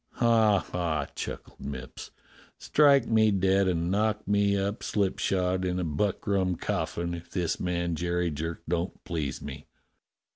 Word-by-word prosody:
"Ha! 115 -3 +4
ha!" 80 -5 -1
chuckled - - -6
Mipps. 65 -2 -7 0.5
"Strike 140 -4 +4
me 110 -1 +4
dead 95 0 +3
and 85 -1 0
knock 105 +1 0
me 100 0 +3
up 100 +3 -2
slipshod 95 -2 0
in 90 0 -1
a - - -1
buckrum 95 +3 0
coffin, 85 +1 -2
if 85 0 -8
this 90 -3 -1
man 85 -1 -1
Jerry 85 +1 -1
Jerk 80 +3 -4
don't 85 +2 -2
please 80 -6 -3
me. - - -8
90 Hz, 140 wpm, -28 LUFS, 85-100 Hz, 0.5 s, Ha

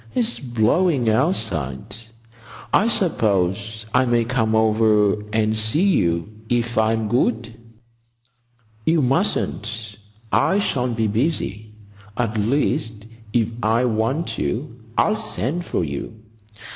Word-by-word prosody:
"It's 240 -1 0
blowing 120 +2 +2
outside. 110 - -1 0.8
I 215 - +4
suppose 110 - 0
I 125 +1 +4
may 120 -1 +2
come 110 -3 0
over 110 -2 +3
and 110 0 +1
see 110 - +1
you 85 - +1 0.2
if 120 -1 0
I'm 110 0 +1
good?" 115 0 0 1.3
"You 160 +3 +2
mustn't. 115 - -1 0.3
I 190 - +3
shall 130 -11 0
be 115 -2 -1
busy. 110 - -2 0.4
At 115 -2 -1
least, 110 -2 0 0.3
if 115 -1 +1
I 115 +3 +2
want 120 +8 -1
you 125 -1 -3 0.2
I'll 215 +1 +3
send 175 - -2
for - - -1
you. 80 +10 -5
115 Hz, 110 wpm, -21 LUFS, 110-130 Hz, 1.3 s, I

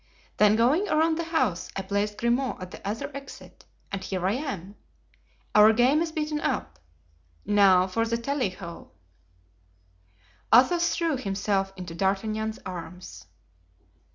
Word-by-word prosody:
Then 210 0 +5
going 280 - +2
around 320 +1 +2
the 335 - -2
house 210 - -1
I 195 - -3
placed 205 +2 -2
Grimaud 240 +2 0
at 185 0 -8
the - - -10
other 270 +7 -4
exit, 275 0 -11 0.3
and 195 -1 -4
here 185 -1 -3
I 190 - +2
am. 205 - -4 0.8
Our 210 +1 +7
game 255 +7 +3
is 335 -1 -1
beaten 305 -1 -2
up. 75 -4 -2 0.7
Now 195 -3 +5
for 210 +5 -1
the 230 +1 0
tally 255 -1 -1
ho." 170 - -10 1.6
Athos 340 +8 +5
threw 330 -5 0
himself 195 -3 -1
into 180 -2 -7
D'Artagnan's 215 +4 -1
arms. 180 - -8
215 Hz, 135 wpm, -26 LUFS, 190-275 Hz, 1.6 s, Our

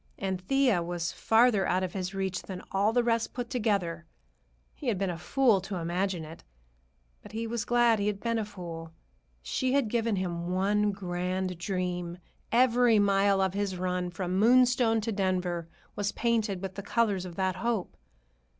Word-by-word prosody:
And 190 -2 -3
Thea 250 -2 +2
was 170 0 -3
farther 225 -3 +3
out 185 +1 +1
of 180 -1 -3
his 185 -2 -3
reach 190 -2 -2
than 185 -1 -8
all 200 +3 +2
the 245 +1 +2
rest 230 -1 0
put 245 0 -4
together. 195 - -1 0.7
He 285 - -8
had 225 -5 +1
been 195 -1 -1
a 170 - -5
fool 230 0 +3
to 195 +1 -5
imagine 175 0 -2
it, 160 +2 -11 0.8
but - - -13
he 225 +1 -3
was 230 -1 -3
glad 240 -2 +3
he 200 - 0
had 205 -1 -1
been 230 +1 -1
a 215 - -2
fool. 170 -5 -8 0.5
She 260 -1 -1
had 275 -6 +2
given 230 -1 0
him 175 -2 -3
one 205 +3 +2
grand 185 -1 -3
dream. 180 -2 -3 0.3
Every 245 -1 +4
mile 200 -1 +3
of 190 -1 +1
his 200 -2 -2
run, 180 0 -1
from 185 +1 -2
Moonstone 245 0 +4
to 225 +2 -2
Denver, 180 -4 -1 0.3
was 205 0 -1
painted 220 -5 0
with 190 -1 -4
the 200 - -6
colors 205 -3 +1
of 180 -2 -8
that 185 -1 -1
hope. 220 -1 -2
195 Hz, 180 wpm, -29 LUFS, 180-225 Hz, 0.8 s, Every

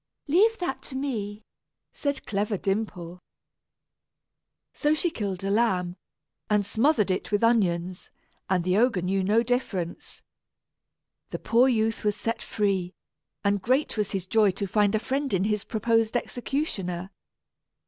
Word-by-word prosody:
"Leave 420 +9 +4
that 350 -7 -3
to 265 - -9
me," 220 -6 -3 0.5
said 285 -1 -2
clever 205 0 -1
Dimple. 185 -3 -3 1.5
So 300 0 +2
she 340 +2 0
killed 195 - -4
a 195 - 0
lamb, 185 -5 +1 0.5
and 210 -1 +2
smothered 220 -1 +2
it 185 - -2
with 205 +1 +1
onions, 185 -6 +1 0.4
and 185 -2 +2
the 185 +2 +2
ogre 225 -6 +2
knew 190 +1 0
no 215 +5 +3
difference. 220 -8 -3 1.1
The - - -4
poor 240 +3 +3
youth 225 -3 +1
was 210 -1 +1
set 230 +2 -3
free, 195 -4 -1 0.5
and 200 -1 +1
great 260 - +1
was 210 -2 0
his 190 -3 -3
joy 210 +2 +4
to 200 +2 -2
find 205 +2 +2
a - - +4
friend 270 +4 -2
in 190 - +1
his 210 0 0
proposed 225 +1 +1
executioner. 195 - -3
210 Hz, 140 wpm, -26 LUFS, 190-240 Hz, 1.5 s, Leave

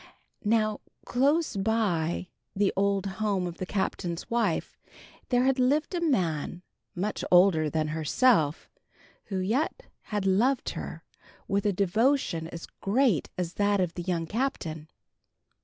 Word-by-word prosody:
Now 215 -1 +2 0.3
close 285 +5 +2
by 195 -5 0 0.3
the 195 0 +2
old 200 0 +1
home 195 -1 -1
of 175 -1 -6
the 185 - -4
Captain's 180 -3 -2
wife 235 0 0 0.5
there 245 -1 +3
had 265 0 +2
lived 285 +7 +2
a 350 - -1
man, 180 - 0 0.3
much 200 +4 -2
older 175 -4 +5
than 155 0 -1
herself, 160 - +2 0.6
who 195 - -4
yet 225 - -1 0.2
had 205 -2 -3
loved 235 +8 +2
her - - -7 0.4
with 200 +1 +1
a - - +3
devotion 200 - +1
as 165 0 -8
great 215 - +1
as 175 -1 -2
that 205 0 +2
of 180 -2 0
the 175 - -5
young 170 -2 -1
Captain. 165 - -3
195 Hz, 135 wpm, -28 LUFS, 175-235 Hz, 0.6 s, older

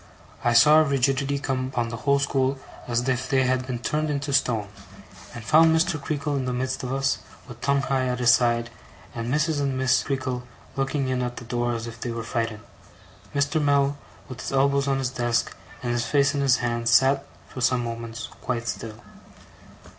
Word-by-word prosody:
I 120 - +3
saw 150 +7 +7
a - - +5
rigidity 140 0 +1
come 130 -2 -2
upon 120 -3 -2
the 115 - -5
whole 140 +4 +2
school 135 -1 0 0.3
as 120 +1 0
if 125 -1 -1
they 135 -1 +3
had 130 0 0
been 125 -2 -2
turned 150 +6 -1
into 145 -1 -2
stone, 115 -6 +1 0.7
and 115 - -7
found 160 +3 +5
Mr. 160 -2 0
Creakle 145 0 -2
in 135 -2 -1
the 125 - -2
midst 130 +1 -2
of 125 - -4
us, 135 0 0 0.3
with 120 -2 -11
Tungay 135 -1 +1
at 125 - -1
his 125 0 +5
side, 120 -1 +1 0.4
and 115 +1 -4
Mrs. 150 +1 +1
and 135 -2 -1
Miss 130 -1 +3
Creakle 130 -2 -2 0.3
looking 135 0 -1
in 130 -1 0
at 125 -1 -3
the 120 - -8
door 120 0 -1
as 115 0 -4
if 115 -1 -9
they 120 - -3
were 115 -1 -4
frightened. 115 -2 -3 0.7
Mr. 140 +3 +1
Mell, 140 -1 +2 0.3
with 130 -5 -8
his - - -5
elbows 140 +1 +2
on 135 -1 +1
his 130 -1 -2
desk 120 -2 -1 0.3
and 120 - -1
his 120 0 0
face 140 0 +3
in 140 - -1
his 135 -2 +4
hands, 115 -1 0
sat, 135 +5 +4 0.2
for 130 - -8
some 125 0 +2
moments, 115 0 -5
quite 120 -2 -3
still. 110 -2 -5
130 Hz, 200 wpm, -25 LUFS, 120-140 Hz, 0.7 s, saw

